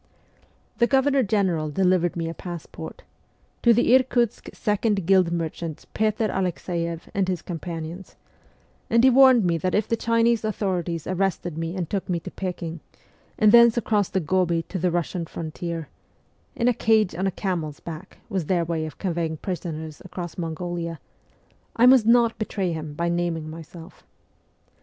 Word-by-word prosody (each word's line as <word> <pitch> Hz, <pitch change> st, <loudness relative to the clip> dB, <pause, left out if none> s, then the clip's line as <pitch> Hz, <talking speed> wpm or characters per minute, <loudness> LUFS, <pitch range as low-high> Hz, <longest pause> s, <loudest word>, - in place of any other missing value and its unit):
The 235 Hz, -, +4 dB
Governor 270 Hz, +1 st, +3 dB
General 190 Hz, -8 st, +1 dB
delivered 180 Hz, +1 st, +2 dB
me 165 Hz, -1 st, -2 dB
a 165 Hz, -, -4 dB
passport, 175 Hz, -1 st, -8 dB, 0.3 s
' -, -, -39 dB
To 235 Hz, -, +5 dB
the 240 Hz, +1 st, +4 dB
Irkutsk 245 Hz, -3 st, +2 dB
second 210 Hz, -3 st, 0 dB
guild 185 Hz, -2 st, +4 dB
merchant 165 Hz, -1 st, -4 dB
Petr 215 Hz, 0 st, +1 dB
Alexeiev 170 Hz, -3 st, -2 dB
and 195 Hz, -2 st, +1 dB
his 180 Hz, -3 st, -2 dB
companions,' 170 Hz, +1 st, -6 dB, 0.7 s
and 230 Hz, +1 st, +4 dB
he 260 Hz, -, +7 dB
warned 260 Hz, -4 st, +6 dB
me 170 Hz, -1 st, +1 dB
that 185 Hz, +2 st, 0 dB
if 210 Hz, -, +1 dB
the 230 Hz, -, +1 dB
Chinese 230 Hz, 0 st, +2 dB
authorities 180 Hz, -6 st, -2 dB
arrested 185 Hz, -3 st, -1 dB
me 165 Hz, +2 st, -3 dB
and 180 Hz, -3 st, -2 dB
took 195 Hz, +1 st, -3 dB
me 175 Hz, -2 st, 0 dB
to -, -, -8 dB
Pekin, 170 Hz, -3 st, -5 dB, 0.6 s
and 215 Hz, -1 st, +5 dB
thence 235 Hz, 0 st, +7 dB
across 210 Hz, -4 st, +1 dB
the 190 Hz, -, 0 dB
Gobi 170 Hz, 0 st, +1 dB
to 190 Hz, -, -3 dB
the 180 Hz, +2 st, +1 dB
Eussian 170 Hz, 0 st, -2 dB
frontier 165 Hz, 0 st, -5 dB, 0.7 s
in 235 Hz, -, +1 dB
a 245 Hz, -, +4 dB
cage 220 Hz, -4 st, +2 dB
on 185 Hz, +4 st, -1 dB
a -, -, 0 dB
camel's 170 Hz, -7 st, -3 dB
back 160 Hz, -2 st, -9 dB
was 190 Hz, -8 st, -3 dB
their 175 Hz, -3 st, +1 dB
way 160 Hz, -1 st, -2 dB
of 155 Hz, -, -10 dB
conveying 170 Hz, -4 st, -2 dB
prisoners 160 Hz, -3 st, -5 dB
across 175 Hz, -1 st, -7 dB
Mongolia 170 Hz, -1 st, -4 dB, 0.8 s
I 235 Hz, -, +5 dB
must 250 Hz, -3 st, +6 dB
not 235 Hz, -1 st, +4 dB
betray 195 Hz, -4 st, -2 dB
him 155 Hz, -2 st, -5 dB
by 170 Hz, +2 st, -1 dB
naming 170 Hz, -2 st, -1 dB
myself. 165 Hz, +2 st, -11 dB
180 Hz, 160 wpm, -24 LUFS, 165-215 Hz, 0.8 s, he